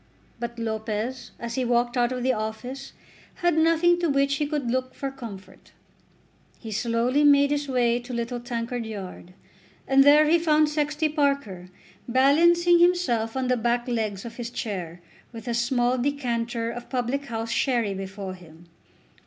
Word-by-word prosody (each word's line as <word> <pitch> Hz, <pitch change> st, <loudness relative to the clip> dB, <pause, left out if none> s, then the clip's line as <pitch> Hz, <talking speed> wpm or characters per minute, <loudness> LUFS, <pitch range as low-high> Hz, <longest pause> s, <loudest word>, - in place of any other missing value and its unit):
But 235 Hz, 0 st, -5 dB
Lopez 220 Hz, +2 st, -3 dB
as 235 Hz, 0 st, -5 dB
he 260 Hz, -, -1 dB
walked 240 Hz, 0 st, +1 dB
out 240 Hz, 0 st, +2 dB
of 250 Hz, -1 st, -3 dB
the 260 Hz, 0 st, +2 dB
office 245 Hz, +5 st, -5 dB, 0.4 s
had 350 Hz, -2 st, +1 dB
nothing 330 Hz, +2 st, +3 dB
to 340 Hz, -2 st, 0 dB
which 275 Hz, 0 st, +2 dB
he 295 Hz, -, -1 dB
could 290 Hz, -5 st, -2 dB
look 255 Hz, 0 st, -2 dB
for 275 Hz, -1 st, -4 dB
comfort. 230 Hz, -8 st, -11 dB, 0.8 s
He 225 Hz, -, -9 dB
slowly 235 Hz, +6 st, +1 dB
made 285 Hz, -1 st, +5 dB
his 290 Hz, 0 st, -1 dB
way 240 Hz, -2 st, +2 dB
to 245 Hz, +1 st, -10 dB
Little 240 Hz, +1 st, -3 dB
Tankard 240 Hz, 0 st, -4 dB
Yard, 190 Hz, -4 st, -8 dB, 0.5 s
and 270 Hz, 0 st, +6 dB
there 295 Hz, +2 st, +7 dB
he 335 Hz, +2 st, +4 dB
found 310 Hz, -2 st, +3 dB
Sexty 300 Hz, +1 st, 0 dB
Parker 280 Hz, -, -1 dB, 0.4 s
balancing 340 Hz, +7 st, +4 dB
himself 265 Hz, -11 st, +2 dB
on 260 Hz, -1 st, -1 dB
the 250 Hz, -, +2 dB
back 240 Hz, +1 st, 0 dB
legs 215 Hz, -5 st, -2 dB
of 230 Hz, 0 st, -9 dB
his 235 Hz, -1 st, -4 dB
chair, 180 Hz, -8 st, -5 dB, 0.3 s
with 230 Hz, 0 st, -10 dB
a 240 Hz, -, -1 dB
small 245 Hz, +1 st, +1 dB
decanter 240 Hz, -4 st, -2 dB
of 245 Hz, 0 st, -9 dB
public 260 Hz, +2 st, -2 dB
house 225 Hz, -2 st, -4 dB
sherry 235 Hz, -5 st, +1 dB
before 195 Hz, 0 st, -6 dB
him. 170 Hz, -1 st, -16 dB
245 Hz, 160 wpm, -25 LUFS, 230-280 Hz, 0.8 s, there